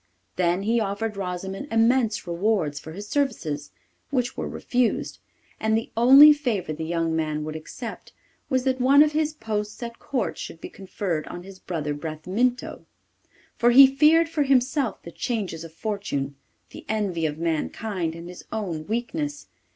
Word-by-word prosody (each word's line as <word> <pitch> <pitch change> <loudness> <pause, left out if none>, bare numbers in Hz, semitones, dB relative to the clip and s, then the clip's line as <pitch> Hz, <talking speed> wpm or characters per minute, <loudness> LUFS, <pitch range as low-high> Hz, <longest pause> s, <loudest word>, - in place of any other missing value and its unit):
Then 180 +1 +1
he 230 +3 +2
offered 210 +1 -2
Rosimond 190 +5 -4
immense 225 0 +2
rewards 170 -4 0
for 160 - -10
his 205 +4 -8
services, 205 - -1 0.4
which 250 -3 -1
were - - -3
refused, 245 -2 -1 0.4
and 220 0 +2
the 225 - -4
only 270 +6 +9
favour 230 - -2
the 155 - -5
young 165 0 -1
man 155 -1 -1
would 155 0 -5
accept 225 +9 -8 0.4
was 260 -2 +1
that 260 -1 0
one 280 +3 +7
of 305 - +1
his 310 0 0
posts 215 -5 -4
at 235 0 -7
Court 235 - -2
should 165 - -7
be - - -8
conferred 185 -4 -4
on 175 - -7
his 190 0 -12
brother 150 -4 -3
Bramintho. 180 +12 -2 0.7
For 240 - +5
he 265 +3 +10
feared 305 +5 +4
for 320 -2 -2
himself 270 -1 +1
the 170 - -9
changes 195 -7 -3
of 165 - -10
fortune, 165 -8 -3 0.4
the - - -10
envy 195 -7 0
of 150 0 -5
mankind 165 +2 -2
and 170 +1 -9
his 180 0 -10
own 175 -8 -4
weakness. 290 +7 -3
210 Hz, 160 wpm, -25 LUFS, 170-250 Hz, 0.7 s, he